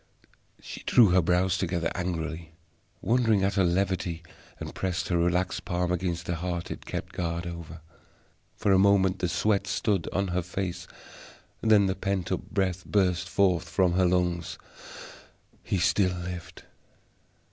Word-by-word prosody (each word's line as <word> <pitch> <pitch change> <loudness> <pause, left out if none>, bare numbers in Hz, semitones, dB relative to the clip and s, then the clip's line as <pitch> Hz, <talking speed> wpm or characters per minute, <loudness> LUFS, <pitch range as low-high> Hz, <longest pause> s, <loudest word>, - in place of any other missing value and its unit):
She - - -9
drew 115 -5 +5
her 90 +1 +4
brows 90 +2 +1
together 85 -2 -1
angrily, 80 -2 -4 0.5
wondering 115 -4 +3
at 100 - +1
her 95 - +2
levity, 90 -2 0 0.4
and - - -6
pressed 90 -2 -2
her 90 - +2
relaxed 90 +2 0
palm 90 -1 -1
against 85 -1 -2
the 85 0 -2
heart 85 0 -4
it - - -8
kept - - -5
guard 85 0 -3
over. 85 -2 -8 0.7
For 105 - +1
a 95 - +5
moment 95 -1 +4
the 90 - 0
sweat 100 +2 +1
stood 100 -5 0
on 100 0 -1
her 90 +1 0
face; 90 +1 -4 0.7
then 110 -3 +5
the 95 - +1
pent 95 -2 -2
up - - 0
breath 95 -2 -1
burst 90 -4 +1
from 90 0 +2
her 90 0 +3
lungs. 90 -2 0 1.0
He 95 - -2
still 90 +1 +2
lived. 90 0 -7
90 Hz, 145 wpm, -27 LUFS, 85-95 Hz, 1.0 s, drew